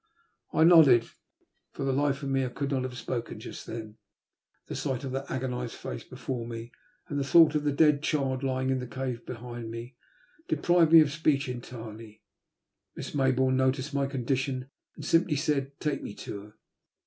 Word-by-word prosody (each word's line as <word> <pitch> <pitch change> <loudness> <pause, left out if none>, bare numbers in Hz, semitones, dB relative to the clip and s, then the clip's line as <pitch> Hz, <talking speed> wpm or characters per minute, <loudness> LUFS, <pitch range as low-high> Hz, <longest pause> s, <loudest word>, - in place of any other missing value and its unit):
I 160 - +3
nodded. 155 -9 +7 0.6
For - - -5
the 135 - +1
hfe 140 +1 0
of 140 - -2
me, 135 0 +1
I 125 - -1
could 140 +3 -3
not 135 -2 +1
have 125 -1 -5
spoken 120 -3 -4
just - - -9
then. 110 -1 -7 0.7
The - - -7
sight 130 0 -2
of 135 - -4
that 135 +1 -4
agonised 125 -2 -3
face - - -6
before 120 -3 -5
me 115 0 -7 0.4
and 145 - -2
the - - 0
thought 160 +2 +6
of 150 -1 0
the 145 - +3
dead 145 0 +4
child 135 -4 0
lying 130 -1 0
in 130 - +1
the 125 - -5
cave 125 0 -4
behind 120 -1 -6
me 115 +3 -7 0.5
deprived 175 -2 +3
me 165 -1 +10
of 145 -2 +2
speech 150 -2 +1
entirely. 115 -3 -8 0.7
Miss - - -6
Maybourne 130 -1 +2
noticed 130 +2 +1
my 140 -1 +1
condition, 130 0 -2 0.2
and 150 - -8
simply 165 0 +3
said, 140 -2 -1
'^ - - -46
Take 150 -3 -1
me 100 - -7
to 100 - -7
her." 105 - -17
130 Hz, 185 wpm, -28 LUFS, 125-140 Hz, 0.7 s, me